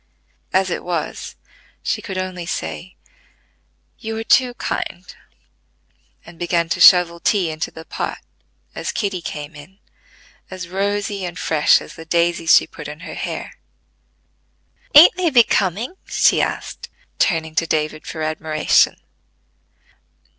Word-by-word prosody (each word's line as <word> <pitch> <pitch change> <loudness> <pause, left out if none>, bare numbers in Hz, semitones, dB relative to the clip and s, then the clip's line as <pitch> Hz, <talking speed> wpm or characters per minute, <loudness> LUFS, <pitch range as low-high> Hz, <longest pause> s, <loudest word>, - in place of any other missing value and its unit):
As 190 -1 +1
it - - -3
was, 175 -3 -4 0.5
she - - -1
could 190 -3 -6
only 185 -2 -4
say, 185 +2 -5 1.0
"You 220 0 -5
are 225 - -3
too 245 +2 +3
kind," 180 -5 -4 1.2
and 165 0 -14
begin 170 -1 0
to - - -1
shovel 175 -2 +7
tea 180 -3 +1
into 155 +1 -4
the 160 - -12
pot, - - -4 0.6
as - - -4
Kitty 195 -4 -2
came 150 -1 -6
in, 150 +6 -14 0.7
as 185 -2 -7
rosy 200 +1 -2
and 175 -1 -5
fresh 155 -2 +3
as - - -11
the 160 - -11
daisies 170 0 +3
she - - +5
put 150 - -10
in 150 +2 -9
her 185 - -8
hair. - - -6 1.4
"Ain't 315 +5 +9
they 360 -2 +2
becoming?" 230 - +2
she - - +3
asked, - - -4 0.3
turning 160 -4 +1
to 165 +1 0
David 155 0 -2
for 160 - -5
admiration. 155 0 +2
175 Hz, 130 wpm, -20 LUFS, 160-195 Hz, 1.4 s, Ain't